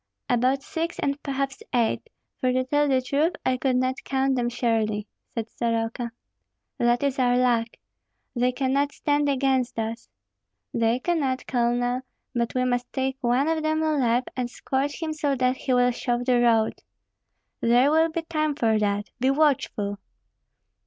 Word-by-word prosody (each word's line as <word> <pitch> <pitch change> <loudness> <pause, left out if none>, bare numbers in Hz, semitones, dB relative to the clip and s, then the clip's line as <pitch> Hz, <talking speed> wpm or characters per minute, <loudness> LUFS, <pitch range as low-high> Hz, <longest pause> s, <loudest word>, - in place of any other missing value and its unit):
"About 255 +3 +2
six, 330 +1 -3
and 280 +1 -1
perhaps 275 -1 -3
eight; 235 -2 0 0.3
for 255 - +1
to 255 +1 +1
tell 290 +3 +1
the 260 -2 +2
truth 295 +6 +1
I 260 - +2
could 255 0 +1
not 255 +1 0
count 270 0 +1
them 240 -1 0
surely," 225 -3 0 0.3
said 230 -1 -2
Soroka. 230 +1 -2 0.7
"That 240 +2 +2
is 275 -1 0
our 245 -1 +3
luck! 240 -2 +2 0.7
They 250 +1 +2
cannot 275 +2 0
stand 290 0 +1
against 265 -3 +1
us." 225 +1 -4 0.6
"They 230 0 +2
cannot. 275 -3 -1
Colonel; 245 0 0 0.3
but 235 -1 -1
we 255 0 +2
must 245 -1 -1
take 265 0 -1
one 250 +4 +2
of 320 -1 +1
them 310 0 0
alive, 255 -6 +2
and 250 -2 -2
scorch 275 +5 -2
him 315 -1 -2
so 290 -2 0
that 255 0 +1
he 260 - -3
will 245 0 +4
show 240 0 -1
the 245 -1 +3
road." 225 -2 +3 0.8
"There 245 +4 +4
will 320 +1 +4
be 330 +1 -3
time 310 -2 -1
for 225 -5 +2
that. 205 0 -1
Be 260 +2 +2
watchful!" 265 -8 +1
255 Hz, 160 wpm, -25 LUFS, 240-280 Hz, 0.8 s, will